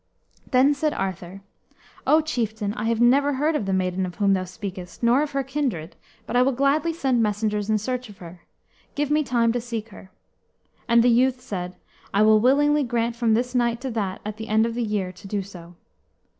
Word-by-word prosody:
Then 265 Hz, +2 st, +4 dB
said 300 Hz, +1 st, -1 dB
Arthur, 190 Hz, 0 st, -5 dB, 0.7 s
"O 310 Hz, +1 st, +5 dB
chieftain, 220 Hz, -9 st, -2 dB
I 225 Hz, -, -4 dB
have 230 Hz, 0 st, 0 dB
never 275 Hz, +4 st, +4 dB
heard 300 Hz, +4 st, 0 dB
of 210 Hz, -9 st, -2 dB
the -, -, 0 dB
maiden 185 Hz, 0 st, 0 dB
of 180 Hz, -1 st, -5 dB
whom 200 Hz, -1 st, +2 dB
thou 185 Hz, -1 st, 0 dB
speakest, 185 Hz, 0 st, -8 dB
nor 240 Hz, +4 st, +4 dB
of 300 Hz, -1 st, -3 dB
her 275 Hz, 0 st, 0 dB
kindred, 265 Hz, -, -3 dB, 0.3 s
but -, -, -5 dB
I 245 Hz, -, +5 dB
will 265 Hz, +2 st, +3 dB
gladly 280 Hz, +6 st, +1 dB
send 265 Hz, -7 st, 0 dB
messengers 210 Hz, -1 st, -1 dB
in 215 Hz, -, +3 dB
search 250 Hz, +2 st, -4 dB
of 205 Hz, -, -13 dB
her. 175 Hz, 0 st, -12 dB, 0.5 s
Give 295 Hz, 0 st, -1 dB
me 305 Hz, +1 st, +3 dB
time 235 Hz, -4 st, +1 dB
to 240 Hz, +1 st, -2 dB
seek 230 Hz, -2 st, -5 dB
her." 190 Hz, -2 st, -13 dB, 0.8 s
And 235 Hz, -1 st, +5 dB
the 245 Hz, -, +4 dB
youth 255 Hz, +2 st, +3 dB
said, 185 Hz, -7 st, -6 dB, 0.4 s
"I 205 Hz, -, +5 dB
will 215 Hz, 0 st, +6 dB
willingly 290 Hz, +5 st, +3 dB
grant 235 Hz, -1 st, -1 dB
from 230 Hz, -2 st, +2 dB
this 245 Hz, +2 st, -1 dB
night 235 Hz, -2 st, +1 dB
to 265 Hz, -1 st, -4 dB
that 200 Hz, -4 st, -3 dB
at 210 Hz, 0 st, -5 dB
the 220 Hz, 0 st, -7 dB
end 220 Hz, +1 st, +3 dB
of 230 Hz, -, -2 dB
the 240 Hz, -, -3 dB
year 210 Hz, -5 st, -2 dB
to 185 Hz, +2 st, -13 dB
do 200 Hz, 0 st, -2 dB
so." 175 Hz, -3 st, -12 dB
230 Hz, 210 wpm, -24 LUFS, 200-260 Hz, 0.8 s, will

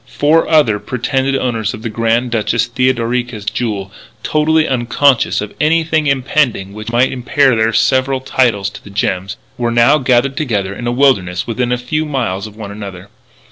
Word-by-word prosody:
Four 155 Hz, +3 st, +2 dB
other 135 Hz, -10 st, +3 dB
pretended 135 Hz, +3 st, -1 dB
owners 115 Hz, -5 st, -1 dB
of 110 Hz, -, -12 dB
the 115 Hz, -, -3 dB
Grand 115 Hz, +2 st, 0 dB
Duchess 115 Hz, 0 st, 0 dB
Theodorica's 120 Hz, -3 st, -1 dB
jewels, 105 Hz, -4 st, -3 dB, 0.3 s
totally 155 Hz, +1 st, +2 dB
unconscious 125 Hz, 0 st, +2 dB
of 105 Hz, -, -6 dB
anything 160 Hz, 0 st, +2 dB
impending 130 Hz, -7 st, 0 dB
which 110 Hz, +2 st, -7 dB
might 120 Hz, +2 st, +2 dB
impair 130 Hz, +1 st, +2 dB
their 110 Hz, 0 st, +2 dB
several 130 Hz, +4 st, +1 dB
titles 115 Hz, -7 st, 0 dB
to -, -, -12 dB
the -, -, -12 dB
gems, 100 Hz, -1 st, -2 dB, 0.2 s
were 120 Hz, -1 st, 0 dB
now 120 Hz, +6 st, +4 dB
gathered 130 Hz, +1 st, +1 dB
together 105 Hz, -10 st, -1 dB
in 120 Hz, +4 st, -6 dB
a -, -, +1 dB
wilderness 100 Hz, -9 st, +1 dB
within 120 Hz, +1 st, -2 dB
a 125 Hz, -, +1 dB
few 125 Hz, +6 st, -2 dB
miles 115 Hz, -9 st, -2 dB
of 105 Hz, -, -14 dB
one 105 Hz, -2 st, -8 dB
another. 100 Hz, -2 st, -9 dB
120 Hz, 170 wpm, -15 LUFS, 110-135 Hz, 0.3 s, now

